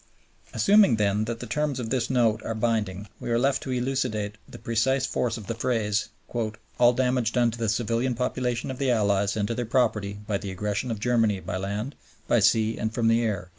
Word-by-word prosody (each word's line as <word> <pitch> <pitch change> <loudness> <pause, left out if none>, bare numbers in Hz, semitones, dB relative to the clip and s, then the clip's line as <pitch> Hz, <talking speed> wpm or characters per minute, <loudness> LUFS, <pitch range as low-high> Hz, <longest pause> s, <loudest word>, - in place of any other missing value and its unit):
Assuming 200 - +5
then 105 0 +1
that 115 0 -4
the - - -5
terms 150 -3 -1
of 115 -2 -4
this 130 -2 0
Note 115 -4 +2
are 115 - -4
binding, 105 -3 -1
we - - -5
are 115 - +2
left 135 +3 +1
to - - -7
elucidate 125 -5 -1
the - - -10
precise 130 +4 +1
force 120 -2 -1
of 110 - -9
the 115 - -3
phrase 110 -3 0 0.7
"all 120 0 +6
damage 125 -2 +1
done 120 -2 +3
to 115 - -7
the 115 -2 0
civilian 120 +3 0
population 125 0 -2
of 130 - -7
the 135 -2 +1
Allies 100 -3 +2
and 105 -1 0
to 115 - -2
their 120 - -2
property 110 -4 +1
by 100 -2 -1
the 100 - -6
aggression 105 +5 -2
of 110 -3 -3
Germany 115 -3 +2
by 95 - -4
land, 100 +8 -3 0.3
by - - +4
sea, 110 0 +3
and 110 - -1
from 115 0 +1
the 115 +1 +3
air." 100 -6 -2
115 Hz, 210 wpm, -26 LUFS, 105-125 Hz, 0.7 s, all